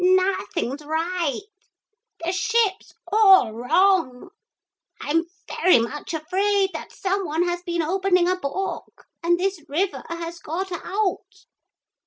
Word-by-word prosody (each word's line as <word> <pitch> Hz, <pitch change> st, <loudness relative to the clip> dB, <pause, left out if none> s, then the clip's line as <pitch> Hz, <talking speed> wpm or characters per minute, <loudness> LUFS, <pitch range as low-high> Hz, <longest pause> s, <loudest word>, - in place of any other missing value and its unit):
Nothing's 365 Hz, -6 st, +1 dB
right. 325 Hz, 0 st, -1 dB, 0.8 s
The 345 Hz, -, +1 dB
ship's 430 Hz, 0 st, 0 dB, 0.2 s
all 385 Hz, -, +6 dB
wrong. 320 Hz, -, +2 dB, 0.7 s
I'm 330 Hz, +3 st, 0 dB, 0.2 s
very 370 Hz, -, +4 dB
much 285 Hz, +8 st, -3 dB
afraid 385 Hz, +5 st, +1 dB, 0.2 s
some 390 Hz, +1 st, -2 dB
one 315 Hz, +3 st, 0 dB
has 350 Hz, 0 st, -2 dB
been 345 Hz, -2 st, -2 dB
opening 365 Hz, +1 st, +2 dB
a 365 Hz, -, +2 dB
book 370 Hz, +3 st, -5 dB, 0.2 s
and 345 Hz, +1 st, +2 dB
this 375 Hz, -3 st, -1 dB
river 360 Hz, +7 st, -1 dB
has 335 Hz, 0 st, -5 dB
got 370 Hz, +5 st, -4 dB
out.' 385 Hz, +1 st, -3 dB
360 Hz, 115 wpm, -23 LUFS, 320-385 Hz, 0.8 s, all